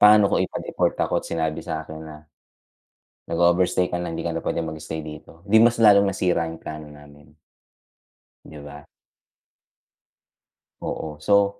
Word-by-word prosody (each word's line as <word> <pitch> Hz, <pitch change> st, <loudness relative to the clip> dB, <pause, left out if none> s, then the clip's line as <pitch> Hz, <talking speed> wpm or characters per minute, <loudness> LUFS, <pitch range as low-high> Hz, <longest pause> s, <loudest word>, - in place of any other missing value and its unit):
Paano 105 Hz, -1 st, +7 dB
kung -, -, +2 dB
ipa-deport -, -, -1 dB
ako -, -, 0 dB
at -, -, -10 dB
sinabi 80 Hz, -2 st, -2 dB
sakin 80 Hz, -2 st, -6 dB
na 75 Hz, -1 st, -11 dB, 1.1 s
"Nag-overstay 85 Hz, +2 st, +2 dB
ka 90 Hz, -, -1 dB
lang 85 Hz, -2 st, -4 dB
hindi 85 Hz, -, -4 dB
ka 85 Hz, -, -1 dB
na 80 Hz, -, -3 dB
pwedeng 80 Hz, -2 st, -2 dB
mag-stay 80 Hz, +1 st, -6 dB
dito." 80 Hz, +3 st, -11 dB
'Di 105 Hz, +2 st, +4 dB
mas 120 Hz, +1 st, +4 dB
lalong 100 Hz, -3 st, +6 dB
nasira 90 Hz, -3 st, 0 dB
yung 80 Hz, -, -8 dB
plano 75 Hz, -1 st, -8 dB
namin. 75 Hz, 0 st, -16 dB, 1.2 s
'Di 75 Hz, -, -11 dB
ba? 75 Hz, 0 st, -10 dB, 2.0 s
Oo, 75 Hz, -2 st, -5 dB
so, 100 Hz, +3 st, +2 dB
85 Hz, 145 wpm, -23 LUFS, 75-95 Hz, 2.0 s, Paano